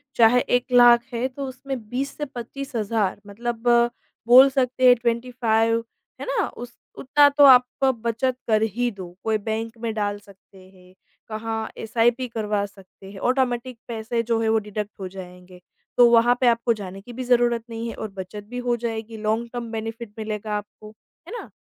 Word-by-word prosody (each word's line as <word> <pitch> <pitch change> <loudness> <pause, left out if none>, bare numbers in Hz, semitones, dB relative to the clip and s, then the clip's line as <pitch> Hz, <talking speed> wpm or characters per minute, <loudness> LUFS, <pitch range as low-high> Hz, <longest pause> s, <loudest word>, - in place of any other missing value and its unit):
चाहे 235 +1 +5 0.2
1 245 - -7
लाख 240 -1 +7
है 235 +2 -1
तो 275 +1 -6
उसमें 265 +1 -6
20 270 +4 -3
से 295 - -3
25 270 +1 -8
हज़ार 215 -3 -1
मतलब 235 +3 -5 0.6
बोल 260 +3 +9
सकते 255 -1 +1
हैं 245 - +8
25 230 -1 0 0.4
है - - -4
ना? - - 0
उस 240 0 -10 0.2
उतना 290 +2 +4
तो 285 0 +4
आपको 260 0 +5
बचत 235 +2 -1
कर 215 -1 +3
ही 245 +1 0
दो। 185 -4 -10
कोई 220 -1 +1
बैंक 225 +2 -4
में 225 -2 -2
डाल 205 -1 -2
सकते 195 -1 -20
हैं, 185 -1 -20 0.4
कहाँ 220 0 -4
एस 225 +1 -9
आई 230 +1 +6
पी 255 +1 -5
करवा 210 -3 -2
सकते 195 -1 -15
हैं, 195 - -10
ऑटोमेटिक 250 0 0
पैसे 230 0 -2
जो 230 0 0
है 220 - +1
वो 220 - +3
डिडक्ट 210 0 -5
हो 190 - -5
जाएँगे। 180 -1 -12 0.4
तो 245 -1 +7
वहाँ 235 +1 +5
पे 255 - +4
आपको 235 0 +3
जाने 195 -2 -8
की 240 +4 -11
भी 255 +2 -5
ज़रूरत 240 -2 +2
नहीं 230 0 -5
है - - -5
और 220 - -5
बचत 205 +3 -7
भी 245 - -6
हो 245 -1 +1
जाएगी 225 -1 -5
लॉन्ग 220 +2 -1
टर्म 235 -2 -5
बेनिफिट 225 0 -6
मिलेगा 215 -1 -4
आपको। 210 +1 -10 0.4
है 365 - -9
ना? - - -9
230 Hz, 190 wpm, -23 LUFS, 215-245 Hz, 0.6 s, बोल